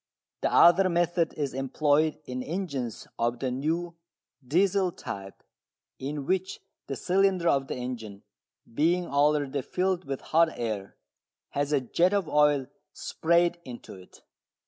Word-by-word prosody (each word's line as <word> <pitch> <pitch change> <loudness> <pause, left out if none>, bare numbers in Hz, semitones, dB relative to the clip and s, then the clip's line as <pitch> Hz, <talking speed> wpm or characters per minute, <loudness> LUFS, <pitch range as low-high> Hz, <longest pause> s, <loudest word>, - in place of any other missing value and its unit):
The - - +1
other 185 +2 +6
method 175 -1 +1
is 145 -3 -2
employed 145 +3 +1
in 125 0 -4
engines 140 - -4
of 120 +1 0
the 130 +1 -2
new 165 +6 -2 0.5
"Diesel" 185 +6 +2
type, 95 - -8 0.6
in 140 +1 -4
which 190 +3 -1 0.3
the 135 - -3
cylinder 185 +3 +2
of 135 -3 +2
the - - -4
engine, 115 -5 -6 0.5
being 170 +7 +2
already 145 -2 +1
filled 185 +5 -1
with 135 -1 -4
hot 165 0 +2
air, 110 -4 -4 0.5
has 145 +1 -2
a 145 -2 +2
jet 175 +9 +2
of 195 -5 0
oil 150 -3 +3 0.3
sprayed 170 +1 +1
into 120 -2 -9
it. 95 -1 -15
150 Hz, 135 wpm, -27 LUFS, 130-175 Hz, 0.6 s, other